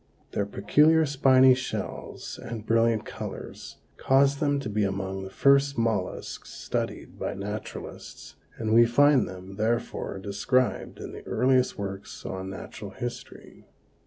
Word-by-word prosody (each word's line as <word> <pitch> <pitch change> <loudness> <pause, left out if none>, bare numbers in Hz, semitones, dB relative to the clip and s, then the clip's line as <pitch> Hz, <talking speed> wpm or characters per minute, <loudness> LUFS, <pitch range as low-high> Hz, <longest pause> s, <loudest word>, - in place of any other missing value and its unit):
Their 100 - -1
peculiar 150 +11 +4
spiny 130 -2 +6
shells 125 0 -5
and 115 -2 -6
brilliant 115 -1 +2
colors - - -8 0.2
caused 140 +1 +3
them 145 -2 +1
to - - -5
be 105 0 0
among 95 -1 -2
the 95 - -7
first 140 +5 +3
mollusks 110 -5 -2
studied - - -4
by - - -3
naturalists 105 +2 -7 0.2
and 110 -1 -1
we 115 +1 +7
find 145 +2 +4
them, 95 +1 -10
therefore, 110 -2 -1
described 120 +6 0
in - - -7
the - - -9
earliest 130 0 +2
works 100 -1 -6
on 95 0 -5
natural 100 +1 -8
history. 120 +5 -8
115 Hz, 130 wpm, -27 LUFS, 100-130 Hz, 0.2 s, we